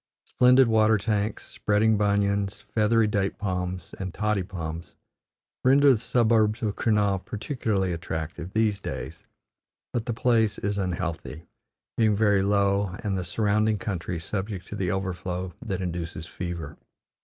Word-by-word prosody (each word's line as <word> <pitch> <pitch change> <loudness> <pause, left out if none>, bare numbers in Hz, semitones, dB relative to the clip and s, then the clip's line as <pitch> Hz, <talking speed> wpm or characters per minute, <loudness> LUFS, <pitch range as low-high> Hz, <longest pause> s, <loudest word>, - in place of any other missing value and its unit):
Splendid 125 +1 +5
water 110 -1 +4
tanks, 105 0 -1
spreading 110 +1 +2
banyans, 100 -1 +1
feathery 110 +1 +2
date 100 -2 0
palms, 90 -3 -3
and 95 -1 -4
toddy 105 +1 0
palms 85 -3 -6 0.7
render 140 +2 +6
the 120 - +2
suburbs 115 -1 +2
of 105 -2 -1
Kurnaul 105 -4 +1
particularly 105 -5 -2
attractive, 80 +1 -5
these 110 -2 +1
days; - - -6 0.7
but 120 0 -2
the 120 - 0
place 110 -3 +2
is 100 0 -2
unhealthy, 85 -3 -3 0.5
being 110 -2 +3
very 100 -2 +3
low 100 -1 +1
and 100 -3 -1
the 95 - -2
surrounding 105 +4 +1
country 90 -4 -3
subject 95 +3 -4
to - - -5
the 95 -3 -1
overflow 90 -1 -3
that 95 -3 -3
induces 85 -2 -4
fever. 85 -4 -6
100 Hz, 135 wpm, -26 LUFS, 90-110 Hz, 0.7 s, render